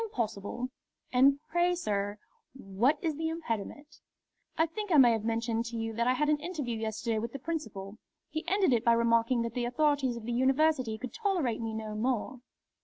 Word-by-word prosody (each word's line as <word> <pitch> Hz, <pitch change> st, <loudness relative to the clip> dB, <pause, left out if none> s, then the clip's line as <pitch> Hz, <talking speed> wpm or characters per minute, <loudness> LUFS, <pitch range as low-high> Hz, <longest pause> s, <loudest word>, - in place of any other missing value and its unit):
"Impossible!" 240 Hz, -, -3 dB, 0.4 s
"And 275 Hz, +3 st, +5 dB
pray, 350 Hz, +1 st, +3 dB
sir, 205 Hz, -, -2 dB, 0.4 s
what 245 Hz, +5 st, +1 dB
is 315 Hz, -3 st, -1 dB
the 320 Hz, 0 st, -1 dB
impediment?" 295 Hz, -1 st, -5 dB, 0.6 s
"I 325 Hz, -, +4 dB
think 415 Hz, +4 st, -5 dB
I 315 Hz, -, +6 dB
may 250 Hz, -4 st, +8 dB
have 225 Hz, -2 st, 0 dB
mentioned 230 Hz, 0 st, -1 dB
to 230 Hz, 0 st, -5 dB
you 225 Hz, 0 st, -3 dB
that 235 Hz, +2 st, 0 dB
I 255 Hz, -, +4 dB
had 300 Hz, +4 st, +1 dB
an 300 Hz, 0 st, +2 dB
interview 295 Hz, -8 st, -3 dB
yesterday 220 Hz, 0 st, -2 dB
with 230 Hz, +1 st, -4 dB
the -, -, -3 dB
Principal. 235 Hz, -9 st, -5 dB, 0.3 s
He 315 Hz, +2 st, -3 dB
ended 380 Hz, -5 st, +3 dB
it 235 Hz, -1 st, +2 dB
by 235 Hz, -1 st, +5 dB
remarking 230 Hz, +1 st, +3 dB
that 230 Hz, -1 st, -4 dB
the 245 Hz, 0 st, -1 dB
authorities 275 Hz, -2 st, +1 dB
of 230 Hz, -, -8 dB
the 240 Hz, -, -2 dB
University 260 Hz, -2 st, +2 dB
could 245 Hz, +3 st, -7 dB
tolerate 360 Hz, -, 0 dB
me 225 Hz, -1 st, -3 dB
no 215 Hz, -1 st, -5 dB
more." 245 Hz, +2 st, -1 dB
245 Hz, 190 wpm, -30 LUFS, 225-300 Hz, 0.6 s, may